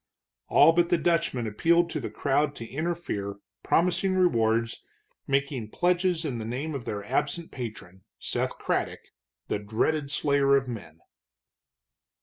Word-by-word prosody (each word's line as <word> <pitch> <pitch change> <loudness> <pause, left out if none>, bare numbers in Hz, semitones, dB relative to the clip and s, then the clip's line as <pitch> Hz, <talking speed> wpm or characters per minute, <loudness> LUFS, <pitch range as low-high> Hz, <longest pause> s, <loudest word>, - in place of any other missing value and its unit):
All 165 - +6
but 170 0 +3
the 175 - +4
Dutchman 165 -8 +1
appealed 170 +10 +2
to 155 - -2
the 125 - -4
crowd 145 +1 0
to 115 - -7
interfere, 155 -10 -3 0.3
promising 180 +2 +2
rewards, 115 -10 +2 0.4
making 135 -5 0
pledges 175 - +1
in 125 -6 -2
the - - -4
name 130 +8 -3
of 135 -4 -5
their 100 -1 -4
absent 150 - -2
patron, 105 -7 -8
Seth - - -2
Craddock, - - -1 0.5
the - - -1
dreaded 130 +8 0
slayer 140 -1 +3
of 135 -1 +1
men. 85 -9 -8
140 Hz, 135 wpm, -27 LUFS, 115-170 Hz, 0.5 s, All